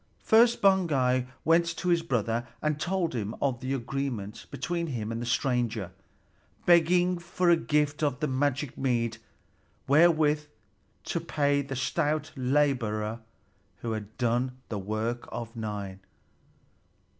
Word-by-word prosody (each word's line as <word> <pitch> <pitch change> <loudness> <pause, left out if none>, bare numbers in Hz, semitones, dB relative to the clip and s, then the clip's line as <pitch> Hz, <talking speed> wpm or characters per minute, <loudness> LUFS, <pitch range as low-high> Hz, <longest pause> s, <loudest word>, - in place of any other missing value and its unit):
First 235 0 +5
Baugi 140 -10 +3 0.2
went 165 0 +3
to 180 - -1
his 170 -1 +3
brother 120 -5 -1
and 150 -1 -1
told 175 0 -1
him 110 -3 -3
of 135 -4 0
the 130 +2 -2
agreement 120 -4 -4
between 170 -1 -3
him 115 -6 -3
and 115 +1 -3
the 120 - -4
stranger, 120 -6 0 0.7
begging 175 +1 +4
for 175 +1 +1
a - - +7
gift 150 -2 0
of 140 -3 0
the - - 0
magic 140 0 -1
mead 115 -4 0 0.7
wherewith 150 0 +4 0.6
to - - -2
pay 145 -1 +1
the 135 -1 -5
stout 150 +3 -1
laborer 125 -5 0 0.6
who 115 - -3
had 110 -1 -6
done 125 +1 0
the 105 - -3
work 110 +4 -3
of 115 0 -6
nine. 105 -4 -5
135 Hz, 135 wpm, -28 LUFS, 115-155 Hz, 0.7 s, a